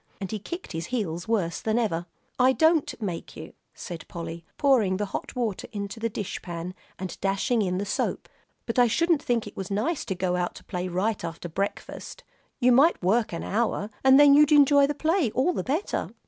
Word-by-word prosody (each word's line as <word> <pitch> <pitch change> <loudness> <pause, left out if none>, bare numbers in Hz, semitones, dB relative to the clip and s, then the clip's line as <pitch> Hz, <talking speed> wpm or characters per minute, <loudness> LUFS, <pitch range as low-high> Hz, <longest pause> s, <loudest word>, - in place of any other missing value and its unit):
And 195 -2 -5
he 215 - -3
kicked 345 - -7
his 165 -1 -4
heels 175 -8 -3
worse 195 -7 0
than 220 +1 0
ever. 175 -7 -1 0.3
"I 255 +1 +5
don't 320 -2 +2
make 185 -6 -5
you," 160 +1 -9 0.2
said 170 -3 -8
Polly, 170 0 -7
pouring 230 -10 +3
the 205 - -1
hot 195 - -6
water 230 -6 -2
into 205 0 -5
the 230 +1 -1
dish 205 -3 -5
pan 175 0 -6 0.2
and 185 -1 -5
dashing 200 +5 +1
in 180 -2 0
the 200 - -2
soap, 190 - -2 0.4
"but 230 +1 -1
I 245 - +6
shouldn't 335 +6 +2
think 235 -2 0
it 205 - -10
was 190 -1 -5
nice 220 - -1
to 190 - -3
go 180 0 0
out 175 -1 -2
to - - -12
play 180 -1 -4
right 190 +4 -1
after 170 +1 -5
breakfast. 195 +5 -5 0.4
You 250 -1 +4
might 280 +8 +5
work 215 +5 +2
an 170 - -4
hour, 215 -1 -1
and 265 +1 +7
then 290 -1 +8
you'd 295 +1 +6
enjoy 285 -1 +6
the 295 - -2
play 320 - +1
all 300 +8 +2
the - - -2
better." 305 +10 -2
215 Hz, 205 wpm, -26 LUFS, 180-265 Hz, 0.4 s, then